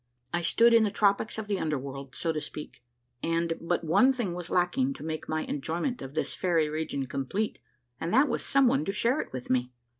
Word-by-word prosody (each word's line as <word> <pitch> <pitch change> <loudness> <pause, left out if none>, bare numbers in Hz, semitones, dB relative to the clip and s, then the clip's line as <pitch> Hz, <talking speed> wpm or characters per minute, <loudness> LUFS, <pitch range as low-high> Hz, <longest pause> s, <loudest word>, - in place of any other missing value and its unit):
I 175 - +1
stood 230 +7 +4
in 230 - +7
the 210 - +2
tropics 205 +2 +1
of 220 - -3
the 205 -2 -1
under 155 -2 0
world, 135 0 -7
so 165 - 0
to 155 -1 -3
speak; 150 -3 -8 0.4
and 165 0 0
but 170 +1 0
one 210 +12 +5
thing 240 -9 -2
was 175 -1 -5
lacking 255 +10 +1
to - - -9
make 155 0 -4
my 155 0 0
enjoyment 170 - -2
of 135 +2 -8
this 155 - -1
fairy 165 -4 +1
region 155 -3 -2
complete, 140 +11 -2 0.4
and 165 - -2
that 265 +6 +5
was 235 - -1
some 275 0 +4
one 270 +4 +2
to - - 0
share 240 +7 +2
it - - -9
with 130 -1 -5
me. 125 0 +1
170 Hz, 220 wpm, -28 LUFS, 155-220 Hz, 0.4 s, in